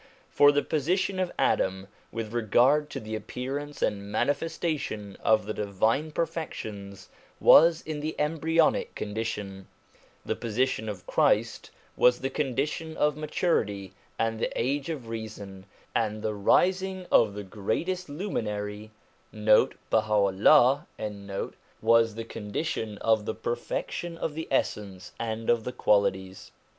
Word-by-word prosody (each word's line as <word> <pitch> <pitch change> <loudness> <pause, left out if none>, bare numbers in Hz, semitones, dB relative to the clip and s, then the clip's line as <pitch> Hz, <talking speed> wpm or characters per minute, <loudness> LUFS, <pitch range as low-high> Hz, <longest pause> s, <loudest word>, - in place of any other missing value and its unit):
For 145 0 +6
the 145 0 +1
position 185 +6 0
of 185 -2 0
Adam, 95 0 +1 0.2
with 115 -1 -5
regard 125 +6 +3
to - - -5
the 110 0 -7
appearance 135 +6 -4
and 100 0 -2
manifestation 145 - -2
of 110 -1 +3
the 110 - -3
divine 110 +9 0
perfections, 105 - -5 0.3
was 165 0 +7
in 155 -1 -4
the 155 +2 -3
embryonic 160 +2 +1
condition; 105 -3 -4 0.6
the - - -1
position 115 -1 -1
of 95 -4 -7
Christ - - +1 0.3
was 125 0 +4
the 135 +1 -2
condition 150 +4 -2
of 150 -1 +2
maturity, 105 - -1 0.2
and 115 0 -1
the - - -1
age 140 +4 -1
of 140 -8 -5
reason, 105 -4 -7 0.3
and 110 -1 -1
the 110 - -1
rising 185 - +2
of 105 -3 +4
the 105 - -5
Greatest 145 - -3
Luminary, 105 - -4 0.4
1 105 -1 -9 2.3
was 115 -1 +4
the 115 0 -5
con 105 -2 -8
dition 110 -7 -2
of 110 -1 +2
the - - -3
perfection 165 +7 -4
of 160 - -3
the 160 +1 -5
essence 100 -7 -2
and 115 -1 -3
of 120 -2 +3
the 125 - -4
qualities. 95 -4 0
115 Hz, 130 wpm, -27 LUFS, 105-150 Hz, 2.3 s, was